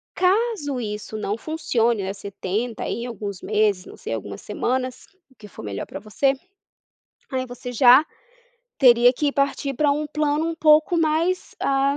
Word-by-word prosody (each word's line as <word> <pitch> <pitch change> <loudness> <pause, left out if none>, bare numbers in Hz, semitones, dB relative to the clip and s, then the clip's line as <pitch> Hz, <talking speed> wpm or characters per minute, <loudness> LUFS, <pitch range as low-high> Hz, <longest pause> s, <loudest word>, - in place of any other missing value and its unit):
Caso 375 - +1
isso 215 -1 -5
não 210 +1 -2
funcione, 235 -8 0
né, 190 - -3
você 200 0 -8
tenta, 215 +6 -3
aí 235 - -3
em - - -4
alguns 205 -5 -6
meses, 210 -3 +1
não - - -11
sei, - - -6
algumas 100 -2 -6
semanas, 255 +4 -2 0.3
o - - -24
que 210 - -13
for 190 - -11
melhor 100 -2 -4
para - - -8
você, 245 +6 +1 1.0
aí 260 -1 -1
você 245 0 -8
já 255 +5 +7 0.7
teria 245 -1 +6
que 285 +2 -1
partir 275 0 0
pra 295 +2 +2
um 300 +1 0
plano 300 +1 0
um 330 - -2
pouco 310 +1 +4
mais, 330 +3 0
ah, 275 +1 +1
255 Hz, 170 wpm, -23 LUFS, 215-300 Hz, 1.0 s, já